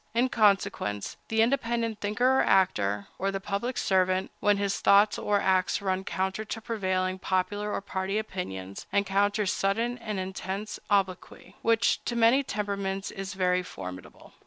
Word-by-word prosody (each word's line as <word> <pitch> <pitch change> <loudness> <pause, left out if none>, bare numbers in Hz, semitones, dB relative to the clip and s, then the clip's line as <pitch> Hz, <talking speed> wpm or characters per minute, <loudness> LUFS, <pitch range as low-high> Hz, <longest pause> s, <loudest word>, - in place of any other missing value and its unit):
In 245 +2 +3
consequence, 195 - +1
the 225 0 +3
independent 235 -3 0
thinker 245 +6 +2
or - - +5
actor, 105 - +2
or 195 - 0
the 195 0 -2
public 205 +6 -3
servant, 185 0 +1
when 205 -1 +3
his 200 -1 -1
thoughts 205 +1 +5
or 205 -1 +1
acts 185 -1 +2
run 190 -1 -1
counter 190 +4 -2
to 220 - -5
prevailing 185 -4 -1
popular 205 +3 -1
or - - -2
party 195 0 -2
opinions, 100 - -5
encounters 200 +1 +1
sudden 230 +5 0
and 215 -4 -4
intense 190 +2 -5
obloquy, 190 -3 -1
which, 230 0 +2
to 240 - -2
many 235 +4 +5
temperaments, 200 -4 -3
is 195 +1 -6
very 180 -1 +2
formidable. 90 - -10
200 Hz, 150 wpm, -28 LUFS, 185-215 Hz, -, or